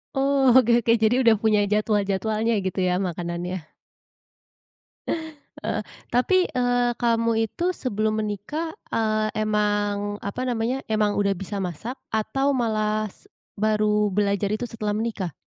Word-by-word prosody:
Oh 270 Hz, -1 st, +3 dB
oke 240 Hz, -2 st, +5 dB
oke. 230 Hz, -, +3 dB
Jadi 220 Hz, +2 st, +3 dB
udah 230 Hz, -2 st, +6 dB
punya 215 Hz, -1 st, +3 dB
jadwal-jadwalnya 215 Hz, +1 st, +1 dB
gitu 190 Hz, -, -2 dB
ya 180 Hz, 0 st, +2 dB
makanannya. 175 Hz, -1 st, -4 dB, 2.0 s
Heeh, -, -, -1 dB, 0.3 s
tapi, 365 Hz, +10 st, +3 dB
eee, 245 Hz, -1 st, +1 dB
kamu 230 Hz, -1 st, +2 dB
itu 355 Hz, -, -1 dB
sebelum 215 Hz, -, -1 dB
menikah, 215 Hz, -, -4 dB, 0.2 s
eee, 215 Hz, -1 st, +1 dB
emang, 205 Hz, -1 st, 0 dB
apa 225 Hz, +6 st, -3 dB
namanya, 245 Hz, +2 st, -1 dB
emang 215 Hz, -1 st, +1 dB
udah 200 Hz, -1 st, +2 dB
bisa 195 Hz, +2 st, -6 dB
masak 195 Hz, -, -4 dB, 0.2 s
atau 270 Hz, +6 st, +1 dB
malah 215 Hz, -3 st, 0 dB
s -, -, -24 dB, 0.3 s
baru 210 Hz, -1 st, +2 dB
belajar 200 Hz, 0 st, +1 dB
itu 240 Hz, +2 st, -3 dB
setelah 210 Hz, -2 st, -3 dB
menikah? 210 Hz, -, -2 dB
215 Hz, 130 wpm, -24 LUFS, 205-235 Hz, 2.0 s, udah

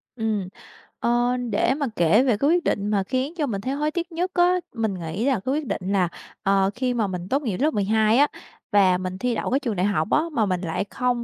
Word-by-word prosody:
Ừm. 220 Hz, -5 st, -1 dB, 0.5 s
Ờ, 240 Hz, +1 st, +1 dB
để 245 Hz, -, +2 dB
mà 285 Hz, 0 st, -2 dB
kể 175 Hz, +8 st, +4 dB
về 245 Hz, -6 st, +2 dB
cái 280 Hz, +7 st, +2 dB
quyết 345 Hz, 0 st, +3 dB
định 205 Hz, -8 st, 0 dB
mà 200 Hz, -2 st, +1 dB
khiến 260 Hz, -, -2 dB
cho 305 Hz, -, +1 dB
mình 200 Hz, -7 st, -3 dB
thấy 260 Hz, +5 st, -2 dB
hối 300 Hz, +2 st, -1 dB
tiếc 345 Hz, +1 st, -4 dB
nhất 355 Hz, +3 st, -2 dB
á, 355 Hz, +1 st, +4 dB, 0.2 s
mình 220 Hz, -4 st, -1 dB
nghĩ 175 Hz, +6 st, -4 dB
là 275 Hz, -, +3 dB
cái 255 Hz, +7 st, -2 dB
quyết 300 Hz, +1 st, -1 dB
định -, -, -2 dB
là, 185 Hz, -4 st, +2 dB, 0.3 s
ờ, 195 Hz, 0 st, +3 dB
khi 250 Hz, 0 st, 0 dB
mà 225 Hz, -4 st, 0 dB
mình 180 Hz, -1 st, -5 dB
tốt 275 Hz, +3 st, +1 dB
nghiệp 215 Hz, -9 st, -2 dB
lớp 300 Hz, +4 st, +2 dB
12 215 Hz, +3 st, +2 dB
á 290 Hz, -, +5 dB, 0.4 s
và 190 Hz, -3 st, +4 dB
mình 185 Hz, 0 st, -4 dB
thi 245 Hz, +2 st, -1 dB
đậu -, -, -2 dB
cái 270 Hz, -, +3 dB
trường 235 Hz, -7 st, -3 dB
đại 180 Hz, +1 st, +1 dB
học 180 Hz, -5 st, +1 dB
á, -, -, +4 dB
mà 225 Hz, -7 st, +1 dB
mình 185 Hz, -2 st, -1 dB
lại 180 Hz, +2 st, -2 dB
không 250 Hz, -1 st, -1 dB
225 Hz, 250 wpm, -24 LUFS, 195-270 Hz, 0.5 s, á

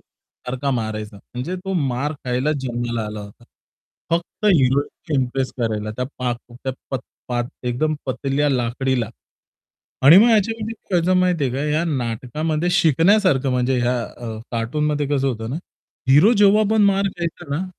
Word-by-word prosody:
सारखा 130 Hz, +2 st, -6 dB
मारायचा. 110 Hz, -2 st, -5 dB
म्हणजे 125 Hz, -, -6 dB
तो 195 Hz, -, -2 dB, 0.2 s
मार 135 Hz, +5 st, -1 dB
खायला 125 Hz, +4 st, 0 dB
जन्माला 120 Hz, -3 st, -2 dB
आला 105 Hz, 0 st, -6 dB
होता. 100 Hz, +3 st, -12 dB, 0.7 s
फक्त 170 Hz, +5 st, -2 dB
हिरोईन 145 Hz, -1 st, +2 dB
इम्प्रेस 130 Hz, +1 st, -2 dB
करायला, 110 Hz, -2 st, -1 dB
त्या 125 Hz, -, -1 dB
पाक 125 Hz, -1 st, -1 dB, 0.3 s
त्या 130 Hz, -, -1 dB, 0.6 s
पाक 120 Hz, -1 st, -1 dB, 0.2 s
एकदम 155 Hz, +6 st, 0 dB
पतल्या 135 Hz, +2 st, 0 dB
लाकडीला. 125 Hz, -1 st, 0 dB, 0.9 s
आणि 145 Hz, +6 st, +9 dB
मग 230 Hz, +4 st, +6 dB
याच्यामध्ये 225 Hz, +1 st, +1 dB
काय 190 Hz, -4 st, -1 dB
व्हायचं 185 Hz, +2 st, +3 dB
माहिती 180 Hz, -5 st, +2 dB
आहे 130 Hz, -, -1 dB
का, 135 Hz, -, -2 dB, 0.2 s
या 165 Hz, -, +1 dB
नाटकामध्ये 150 Hz, +4 st, -1 dB
शिकण्यासारखं 170 Hz, -3 st, +3 dB
म्हणजे 125 Hz, 0 st, +1 dB
या 120 Hz, +1 st, +1 dB
अ, 115 Hz, -2 st, -7 dB
कार्टूनमध्ये 145 Hz, +6 st, 0 dB
कसं 140 Hz, -2 st, +1 dB
होतं 115 Hz, -2 st, -4 dB
ना 140 Hz, -, -2 dB, 0.5 s
हिरो 150 Hz, -, +7 dB
जेव्हा 205 Hz, +1 st, +6 dB
पण 220 Hz, -1 st, +4 dB
मार 200 Hz, 0 st, +3 dB
खायचा 170 Hz, -1 st, -4 dB
ना, 180 Hz, -, -2 dB
135 Hz, 150 wpm, -21 LUFS, 120-170 Hz, 0.9 s, आणि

